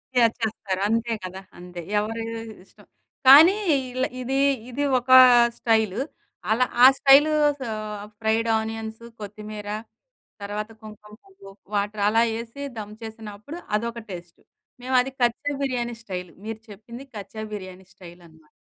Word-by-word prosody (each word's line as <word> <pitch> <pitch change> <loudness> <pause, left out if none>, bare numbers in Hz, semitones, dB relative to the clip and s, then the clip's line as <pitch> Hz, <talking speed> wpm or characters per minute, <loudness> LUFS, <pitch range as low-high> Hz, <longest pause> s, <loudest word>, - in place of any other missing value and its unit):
Share 230 -2 +4
చేస్తారు 205 -4 -3
అంతే 230 +1 0
కదా. 185 +1 -7 0.2
అంతే 180 0 -9 0.2
ఎవరి 225 +2 -3 0.4
ఇష్టం - - -22 0.4
కానీ, 310 +8 +9 0.4
ఇల 255 +1 -1 0.2
ఇది, 265 +2 -1 0.3
ఇది 270 +4 -3 0.2
ఒక 250 +1 -16 0.5
స్టైల్. 220 -3 +1 0.5
అలా 245 +3 +3 0.2
ఆ - - +12
స్టైల్ 280 +2 +6 0.3
స - - -15 0.6
ఫ్రైడ్ 225 +1 0
ఆనియన్స్, 220 0 -6 0.2
కొత్తిమీర 210 0 -8 0.7
తర్వాత 210 +2 -5
కుంకుమ 210 -1 -13
పువ్వు 385 - -15 0.2
వాటర్ 205 +1 -1
అలా 225 +2 +3
వేసి 230 +5 -7
దమ్ 210 -1 -7
చేసినప్పుడు, 220 +6 -9 0.2
అదొక 235 +1 -5
టేస్ట్. 175 -1 -10 0.4
మేము 255 +1 -2
అది 265 +2 -5
కచ్చా 240 +4 +1
బిర్యానీ 245 -3 -2
స్టైల్. 180 -4 -6
మీరు 220 0 -5
చెప్పింది 230 +5 -11
కచ్చా 210 +1 -8
బిర్యానీ 185 -2 -8
స్టైల్ 180 -2 -14
అనమాట. 160 -1 -22
220 Hz, 130 wpm, -24 LUFS, 205-240 Hz, 0.7 s, ఆ